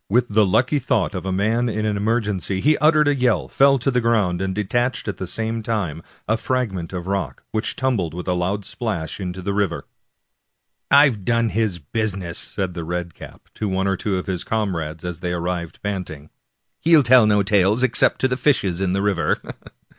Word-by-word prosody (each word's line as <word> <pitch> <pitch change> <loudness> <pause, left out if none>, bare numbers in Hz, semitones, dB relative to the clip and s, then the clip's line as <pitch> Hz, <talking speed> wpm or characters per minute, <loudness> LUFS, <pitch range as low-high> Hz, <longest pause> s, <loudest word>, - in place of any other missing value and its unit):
With 120 +4 +2
the 105 0 +3
lucky 130 +10 +2
thought 125 - 0
of 95 0 -5
a - - -1
man 110 +6 +1
in 110 0 -2
an 105 -1 0
emergency, 105 -3 -1
he 150 +8 +3
uttered 155 -1 +4
a 145 - +4
yell, 125 - +1
fell 135 0 +4
to 135 +2 0
the 125 -1 +1
ground, 105 -6 +1
and 95 -1 -2
detached 120 +5 -1
at 105 - -3
the 95 - -5
same 110 +4 -2
time 100 -9 -2 0.3
a 110 - +2
fragment 105 -11 -2
of 90 -2 -4
the 95 - -4
rock, 90 -9 -3
which 110 - -2
tumbled 110 -11 -1
with 90 - -6
a 90 - +1
loud 95 +3 -2
splash 95 - -4
into 95 -1 -5
the 100 - -1
river. 100 -4 -1 0.6
" - - -54 0.2
I've 140 -8 +5
done 115 +2 +1
his 110 -4 0
business," 90 +1 -3
said 95 -3 -4
the 85 -1 -5
red 85 0 -4
cap - - -12
to 105 - -3
one 95 0 0
or 95 0 +1
two 100 0 -2
of 90 - -4
his 90 -2 -3
comrades 85 -7 -3
as 90 -2 -5
they 90 0 -3
arrived 85 -1 -4
panting. 90 -7 -5 0.2
" - - -53
He'll 160 -3 +5
tell 125 -2 +6
no 105 -1 +3
tales, 105 +3 +3
except 130 -2 +3
to 130 - +4
the 125 0 -2
fishes 100 - +1
in 95 -1 0
the 100 +1 0
river." 90 -7 +1
100 Hz, 210 wpm, -21 LUFS, 90-115 Hz, 0.6 s, tell